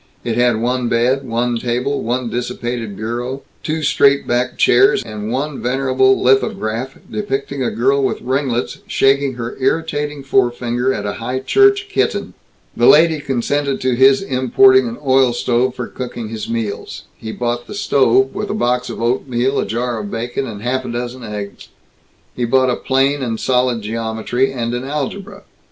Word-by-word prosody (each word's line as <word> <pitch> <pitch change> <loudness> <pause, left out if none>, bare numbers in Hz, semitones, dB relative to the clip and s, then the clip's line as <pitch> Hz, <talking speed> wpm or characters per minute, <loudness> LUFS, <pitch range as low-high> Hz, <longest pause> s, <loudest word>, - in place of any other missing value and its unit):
It 115 -2 -2
had 120 -2 +2
one 125 +1 0
bed, 125 +3 +1
one 120 0 -1
table, 125 +4 -1
one 120 +2 -2
dissipated 120 -3 -4
bureau, 120 +5 -4 0.2
two 155 0 -3
straight 140 0 +3
bare 120 +1 0
chairs, 205 - +4
and 105 -1 -6
one 140 +3 -3
venerable 130 +1 +2
lithograph 125 -1 0
depicting 140 -9 -3
a 120 - 0
girl 135 +4 +1
with 130 - 0
ringlets 130 -1 -2
shaking 135 -1 +2
her 120 0 -5
irritating 145 0 -1
forefinger 120 -1 +1
at 105 -5 -3
a 100 - -2
high 125 +3 -2
church 400 - +3
kitten. 410 - -1 0.4
The - - +3
landlady 160 -1 +5
consented 140 +2 -1
to 130 -1 +1
his 135 +6 +5
importing 310 - +4
an 235 +1 -6
oil 130 -2 +4
stove 125 +1 0
for 125 - -4
cooking 120 -3 -6
his 110 -1 -6
meals. 115 -3 -4
He 110 - -7
bought 120 +1 -3
the 210 - -7
stove, 130 - +2
with 210 - -4
a - - -2
box 125 - 0
of - - -6
oatmeal, 125 +2 0
a - - -1
jar 120 +2 -2
of 105 -1 -5
bacon, 120 +4 -3
and 105 -2 -8
half 130 +2 -1
a 125 - -6
dozen 120 +1 -5
eggs. 105 -2 -7 0.7
He 120 - -1
bought 130 +1 +3
a - - 0
plane 135 +2 +1
and 115 -3 -2
solid 125 -3 +1
geometry, 115 +4 -1
and 120 -2 -3
an 120 +1 -3
algebra. 150 +8 -5
125 Hz, 170 wpm, -18 LUFS, 120-135 Hz, 0.7 s, landlady